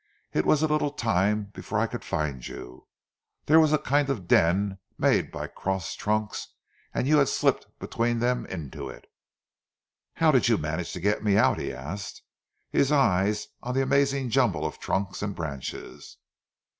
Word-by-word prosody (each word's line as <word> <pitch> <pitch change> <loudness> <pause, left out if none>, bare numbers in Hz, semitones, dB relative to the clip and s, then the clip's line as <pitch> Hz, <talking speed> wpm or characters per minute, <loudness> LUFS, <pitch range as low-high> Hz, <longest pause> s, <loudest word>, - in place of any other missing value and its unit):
"It 75 - +1
was 155 0 +4
a - - +4
little 150 -1 +1
time 105 -5 0
before - - -4
I - - +3
could - - -6
find 70 -5 -3
you. - - -10 0.6
There 160 +2 +6
was 155 -2 +4
a 155 - +5
kind 145 0 +1
of 105 -10 -3
den 95 +4 +3 0.2
made - - +2
by - - -4
crossed 95 -2 -4
trunks, 105 0 -1 0.4
and 130 - -1
you 150 +1 +5
had 140 - +3
slipped - - +1
between 120 +1 -1
them 125 +1 0
into 80 -7 -6
it." - - -11 1.1
"How 160 -1 +4
did 130 -4 +3
you 115 - +4
manage 80 +3 -3
to - - -5
get 105 +4 0
me 100 -2 +3
out?" - - +4
he - - -3
asked, 80 +11 -7 0.5
his 140 - +2
eyes 105 -7 +2
on 125 +1 -4
the 135 - +3
amazing 135 -1 +1
jumble 110 - +2
of 75 - -4
trunks 95 0 -2
and 100 -1 -3
branches. 70 -6 -7
105 Hz, 170 wpm, -27 LUFS, 90-135 Hz, 1.1 s, There